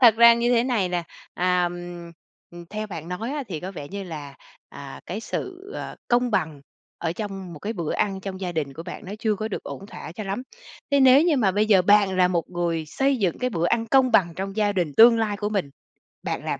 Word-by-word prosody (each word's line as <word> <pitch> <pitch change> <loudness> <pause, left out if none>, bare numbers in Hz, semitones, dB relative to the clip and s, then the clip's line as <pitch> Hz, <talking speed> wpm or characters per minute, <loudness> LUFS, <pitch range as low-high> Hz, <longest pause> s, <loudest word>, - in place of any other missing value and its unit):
Thật 235 -4 +8
ra 235 0 +8
như 235 +1 +1
thế 240 0 +3
này 230 -8 +1
nè, 175 -1 -1 0.3
à, 180 0 +2 0.9
ừm, 175 0 -11
theo 215 +1 -4
bạn 165 -5 -7
nói 210 +7 -4
á, 295 -1 -2
thì 165 -5 -4
có 185 - -5
vẻ 145 -6 -8
như 200 +3 -5
là, 150 -5 -8 0.3
à, 140 -1 -10
cái 195 +5 -4
sự, 380 - -6
ờ, - - -6
công 245 0 +2
bằng 155 -8 -1 0.4
ở 165 -1 -2
trong 195 -2 -6
một 155 - -9
cái 210 +8 -4
bữa 170 -8 -3
ăn 195 -2 -1
trong 190 -1 -6
gia 180 -2 -3
đình 150 -4 -2
của 160 - -8
bạn 180 +4 -8
nó 190 - -7
chưa 220 -1 +1
có 215 +2 -4
được 205 - -4
ổn 195 - -8
thỏa 165 - -9
cho 215 +4 -6
lắm. 195 +5 -3 0.5
Thế 280 0 +4
nếu 265 +2 +7
như 330 -3 +3
mà 215 -7 +3
bây 205 +3 +1
giờ 200 -4 +5
bạn 200 0 +4
là 180 -1 +4
một 175 -2 0
người 170 -2 -1
xây 270 - +1
dựng 190 -8 0
cái 250 0 -1
bữa 170 -5 0
ăn 230 +3 +1
công 255 +1 +4
bằng 175 -4 +4
trong 195 +1 -4
gia 210 -1 +2
đình 175 -6 -1
tương 230 0 +8
lai 215 -2 0
của 205 +1 -2
mình, 195 -9 -2 0.5
bạn - - -3
làm - - -2
195 Hz, 245 wpm, -24 LUFS, 175-230 Hz, 0.9 s, Thật